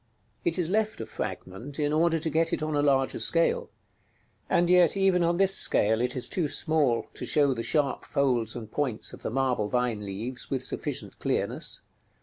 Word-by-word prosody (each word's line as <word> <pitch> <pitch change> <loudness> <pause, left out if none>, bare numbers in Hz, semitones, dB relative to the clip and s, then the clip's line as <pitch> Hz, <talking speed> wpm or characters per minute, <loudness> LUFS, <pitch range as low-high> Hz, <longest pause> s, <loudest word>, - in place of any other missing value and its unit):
§ - - -41
XLIX. - - -42 0.4
It 170 0 +1
is 175 -2 0
left 215 +1 0
a - - -4
fragment, 110 +11 -6
in 150 -1 0
order 165 +1 +2
to 160 0 -2
get 165 +2 +2
it - - -1
on 155 -1 -2
a 145 - +2
larger 135 -2 +1
scale; 165 0 +1 0.8
and 175 - +3
yet 180 0 +4
even 190 -2 +3
on 170 +1 +1
this 195 0 +5
scale 110 - +4
it 125 0 -1
is 125 - 0
too 175 -5 -1
small 145 -8 +1
to - - -7
show 145 -3 +3
the 115 - -4
sharp 140 +1 0
folds 125 -6 0
and 110 -3 -8
points 130 -7 -2
of - - -11
the - - -3
marble 125 -4 0
vine 125 -3 -1
leaves 110 +6 -5
with 130 -2 -2
sufficient - - -3
clearness. - - -1
140 Hz, 200 wpm, -27 LUFS, 125-165 Hz, 0.8 s, this